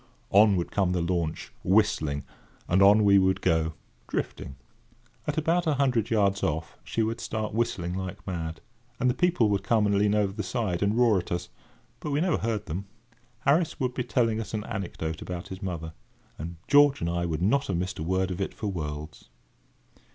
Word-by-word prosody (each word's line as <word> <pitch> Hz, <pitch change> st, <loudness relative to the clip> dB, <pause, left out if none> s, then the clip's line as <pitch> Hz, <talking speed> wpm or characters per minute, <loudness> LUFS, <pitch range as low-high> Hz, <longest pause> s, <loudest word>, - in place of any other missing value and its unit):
On 105 Hz, 0 st, +6 dB
would 85 Hz, -2 st, -2 dB
come 95 Hz, -3 st, +1 dB
the 90 Hz, -, 0 dB
launch, 85 Hz, -2 st, -2 dB
whistling, 80 Hz, -8 st, +2 dB, 0.4 s
and 90 Hz, +3 st, +3 dB
on 105 Hz, +2 st, +7 dB
we 100 Hz, -1 st, +6 dB
would 95 Hz, 0 st, +2 dB
go, 80 Hz, -2 st, +1 dB, 0.3 s
drifting. 65 Hz, -, -4 dB, 0.7 s
At -, -, -1 dB
about 165 Hz, +2 st, +1 dB
a 155 Hz, -, +3 dB
hundred 125 Hz, -5 st, +1 dB
yards 100 Hz, -3 st, +2 dB
off, 80 Hz, +1 st, -2 dB
she 115 Hz, -, -1 dB
would 115 Hz, +1 st, -2 dB
start 110 Hz, -1 st, -3 dB
whistling 90 Hz, -6 st, -1 dB
like 95 Hz, +1 st, -5 dB
mad, 80 Hz, -3 st, -4 dB, 0.4 s
and 125 Hz, -1 st, +3 dB
the -, -, -1 dB
people 170 Hz, -5 st, +2 dB
would 100 Hz, -1 st, +1 dB
come 105 Hz, +2 st, +2 dB
and 105 Hz, -, +2 dB
lean 105 Hz, 0 st, +3 dB
over 100 Hz, -2 st, +1 dB
the 105 Hz, -, -3 dB
side, 95 Hz, -4 st, -2 dB
and 100 Hz, +2 st, +1 dB
roar 115 Hz, -5 st, +4 dB
at 90 Hz, -, -8 dB
us; 85 Hz, 0 st, -2 dB, 0.5 s
but -, -, -5 dB
we 145 Hz, 0 st, +1 dB
never 175 Hz, 0 st, +1 dB
heard 110 Hz, -2 st, -2 dB
them! 90 Hz, +5 st, -5 dB, 0.5 s
Harris 155 Hz, +4 st, +2 dB
would 125 Hz, -1 st, 0 dB
be 125 Hz, -, -2 dB
telling 115 Hz, -2 st, +1 dB
us 110 Hz, -, -5 dB
an 105 Hz, -, -3 dB
anecdote 85 Hz, -7 st, -4 dB
about 90 Hz, -1 st, -6 dB
his 95 Hz, +1 st, -7 dB
mother, 85 Hz, -4 st, -4 dB, 0.4 s
and 85 Hz, +3 st, -6 dB
George 145 Hz, -1 st, +6 dB
and 85 Hz, -, -1 dB
I 85 Hz, 0 st, -1 dB
would 80 Hz, 0 st, -2 dB
not 140 Hz, +8 st, +2 dB
have 95 Hz, -, -1 dB
missed 90 Hz, 0 st, -3 dB
a -, -, -2 dB
word 95 Hz, +2 st, 0 dB
of 90 Hz, +2 st, -4 dB
it 95 Hz, -, -3 dB
for 105 Hz, -, -3 dB
worlds. 75 Hz, -3 st, -6 dB
100 Hz, 200 wpm, -27 LUFS, 85-115 Hz, 0.7 s, on